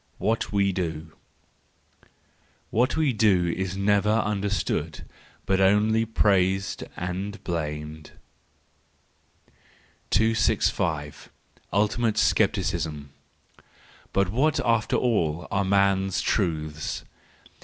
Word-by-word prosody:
What 110 Hz, +1 st, -1 dB
we 100 Hz, -1 st, +2 dB
Do 80 Hz, -3 st, -4 dB, 1.6 s
.—What 125 Hz, +7 st, +1 dB
we 155 Hz, -5 st, +2 dB
do 100 Hz, -5 st, +3 dB
is 95 Hz, 0 st, -3 dB
never 100 Hz, +1 st, +2 dB
understood, 105 Hz, -2 st, -1 dB, 0.4 s
but 95 Hz, 0 st, +1 dB
only 105 Hz, +3 st, +3 dB
praised 95 Hz, -3 st, +1 dB
and 95 Hz, +4 st, -4 dB
blamed. 75 Hz, -2 st, -4 dB, 2.0 s
265. 90 Hz, -8 st, 0 dB, 0.4 s
Ultimate 110 Hz, +2 st, +1 dB
Scepticism 85 Hz, -10 st, 0 dB, 1.0 s
.—But 100 Hz, -2 st, +1 dB
what 140 Hz, +9 st, +1 dB
after 115 Hz, -2 st, +1 dB
all 85 Hz, -9 st, 0 dB
are 100 Hz, 0 st, +1 dB
man's 95 Hz, -1 st, +2 dB
truths 80 Hz, -5 st, -2 dB
100 Hz, 80 wpm, -25 LUFS, 85-105 Hz, 2.0 s, do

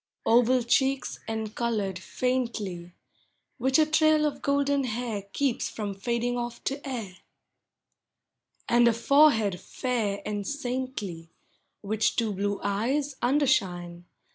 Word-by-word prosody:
Oval 245 Hz, +2 st, +4 dB
cheeks 265 Hz, +3 st, +1 dB
encolored 220 Hz, -3 st, -2 dB
faintly, 215 Hz, -6 st, -2 dB, 0.7 s
Which 265 Hz, +3 st, +3 dB
a 310 Hz, -, +5 dB
trail 310 Hz, 0 st, +3 dB
of 295 Hz, -, -2 dB
golden 280 Hz, -1 st, +1 dB
hair 225 Hz, -4 st, -3 dB
Keeps 275 Hz, -1 st, 0 dB
from 205 Hz, -2 st, -4 dB
fading 235 Hz, +4 st, -1 dB
off 240 Hz, 0 st, -5 dB
to 275 Hz, +1 st, -3 dB
air; 215 Hz, -8 st, -5 dB, 1.5 s
And 240 Hz, 0 st, +5 dB
a 235 Hz, -, +4 dB
forehead 230 Hz, -6 st, +4 dB
fair 225 Hz, -6 st, -2 dB
and 205 Hz, -1 st, -3 dB
saintly, 245 Hz, -, -4 dB, 0.5 s
Which 215 Hz, +1 st, 0 dB
two 225 Hz, -3 st, 0 dB
blue 200 Hz, +1 st, -1 dB
eyes 260 Hz, +9 st, 0 dB
undershine. 185 Hz, -11 st, +1 dB
235 Hz, 115 wpm, -27 LUFS, 205-265 Hz, 1.5 s, a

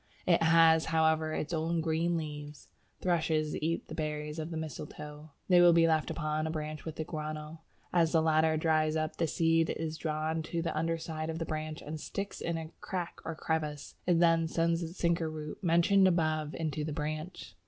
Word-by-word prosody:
It 170 Hz, -2 st, +4 dB
has, 165 Hz, 0 st, +6 dB
however, 160 Hz, -1 st, +2 dB
its 155 Hz, +1 st, -3 dB
own 165 Hz, +1 st, 0 dB
green 165 Hz, +1 st, +1 dB
leaves. 150 Hz, -2 st, -7 dB, 0.3 s
Thrushes 160 Hz, -3 st, +1 dB
eat 165 Hz, +2 st, -2 dB
the -, -, -8 dB
berries 150 Hz, 0 st, -3 dB
of 155 Hz, +1 st, -4 dB
the 165 Hz, -, -4 dB
mistletoe; 150 Hz, -1 st, -7 dB, 0.2 s
they 180 Hz, -2 st, +6 dB
will 175 Hz, -1 st, +7 dB
be 165 Hz, 0 st, +5 dB
left 160 Hz, -1 st, +1 dB
upon 155 Hz, -1 st, -1 dB
a -, -, -2 dB
branch 155 Hz, -1 st, -5 dB
with 160 Hz, -1 st, -5 dB
the 160 Hz, -, -3 dB
guano; 155 Hz, 0 st, -6 dB, 0.3 s
as 165 Hz, -2 st, +3 dB
the 165 Hz, -, +4 dB
latter 160 Hz, 0 st, +3 dB
dries 155 Hz, -1 st, +2 dB
up, 155 Hz, 0 st, -2 dB
the 165 Hz, -, +1 dB
seed 165 Hz, +1 st, +2 dB
is 160 Hz, 0 st, -3 dB
drawn 155 Hz, 0 st, -1 dB
to 165 Hz, +1 st, -3 dB
the 165 Hz, -, -2 dB
underside 160 Hz, 0 st, -2 dB
of 160 Hz, -, -3 dB
the 165 Hz, -, -3 dB
branch, 155 Hz, 0 st, -4 dB
and 155 Hz, +1 st, -6 dB
sticks 200 Hz, +6 st, -5 dB
in 170 Hz, 0 st, -1 dB
a 160 Hz, 0 st, -6 dB
crack 180 Hz, -3 st, -4 dB
or 165 Hz, -, -4 dB
crevice; 155 Hz, -2 st, -3 dB
it 175 Hz, -2 st, +4 dB
then 165 Hz, -1 st, +4 dB
sends 165 Hz, +1 st, +1 dB
the 165 Hz, -, -2 dB
sinker 170 Hz, -1 st, 0 dB
root 155 Hz, +4 st, -7 dB
mentioned 180 Hz, +3 st, +5 dB
above 155 Hz, -3 st, +1 dB
into 155 Hz, -2 st, -2 dB
the 150 Hz, 0 st, -3 dB
branch. 155 Hz, -, -5 dB
160 Hz, 195 wpm, -31 LUFS, 155-165 Hz, 0.3 s, will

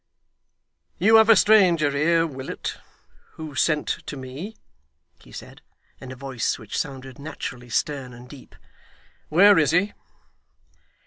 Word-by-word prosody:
'You 220 Hz, +5 st, +5 dB
have 220 Hz, 0 st, +5 dB
a 225 Hz, -, +8 dB
stranger 180 Hz, -10 st, +4 dB
here, 165 Hz, +4 st, +2 dB
Willet, 135 Hz, -4 st, -6 dB, 0.6 s
who 155 Hz, -2 st, -9 dB
sent 150 Hz, +2 st, 0 dB, 0.2 s
to 145 Hz, -, -6 dB
me,' 135 Hz, +12 st, -8 dB, 0.6 s
he -, -, -19 dB
said, -, -, -11 dB, 0.4 s
in 130 Hz, -1 st, -10 dB
a -, -, -8 dB
voice 130 Hz, -2 st, -3 dB
which 110 Hz, -4 st, -9 dB
sounded 135 Hz, -2 st, -5 dB
naturally 125 Hz, -4 st, -7 dB
stern 135 Hz, 0 st, -2 dB
and 120 Hz, +1 st, -13 dB
deep. 130 Hz, 0 st, -15 dB, 0.7 s
'Where 195 Hz, +4 st, +6 dB
is 150 Hz, -3 st, +2 dB
he? 180 Hz, +6 st, +1 dB
145 Hz, 130 wpm, -23 LUFS, 130-170 Hz, 0.7 s, a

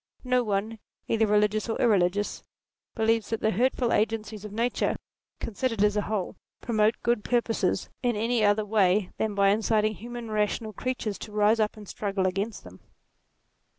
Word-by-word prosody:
No 250 Hz, -1 st, +2 dB
one, 215 Hz, +1 st, -2 dB, 0.3 s
either 225 Hz, -1 st, +2 dB
religious 210 Hz, +1 st, +2 dB
or 225 Hz, -, -2 dB
irreligious, 205 Hz, -2 st, +2 dB, 0.5 s
believes 225 Hz, -1 st, +1 dB
that 225 Hz, -, -1 dB
the 220 Hz, -, +2 dB
hurtful 245 Hz, +2 st, +1 dB
agencies 215 Hz, -1 st, -1 dB
of 210 Hz, -, -7 dB
nature, 230 Hz, +4 st, 0 dB, 0.4 s
considered 230 Hz, -1 st, -1 dB
as 210 Hz, 0 st, +3 dB
a 210 Hz, -, +2 dB
whole, 205 Hz, -3 st, -3 dB, 0.2 s
promote 220 Hz, -2 st, +2 dB
good 235 Hz, -3 st, +1 dB
purposes, 235 Hz, -2 st, 0 dB
in 245 Hz, -3 st, +1 dB
any 225 Hz, +1 st, +1 dB
other 205 Hz, +1 st, +3 dB
way 200 Hz, -2 st, +2 dB
than 215 Hz, -2 st, -1 dB
by 200 Hz, 0 st, +4 dB
inciting 215 Hz, +1 st, +2 dB
human 235 Hz, +1 st, -7 dB
rational 215 Hz, +1 st, -1 dB
creatures 225 Hz, -2 st, -3 dB
to 215 Hz, -, -8 dB
rise 210 Hz, +2 st, +3 dB
up 215 Hz, 0 st, 0 dB
and 210 Hz, -1 st, -11 dB
struggle 195 Hz, -1 st, -2 dB
against 195 Hz, +3 st, -2 dB
them. 90 Hz, +1 st, -13 dB
215 Hz, 160 wpm, -27 LUFS, 205-230 Hz, 0.5 s, by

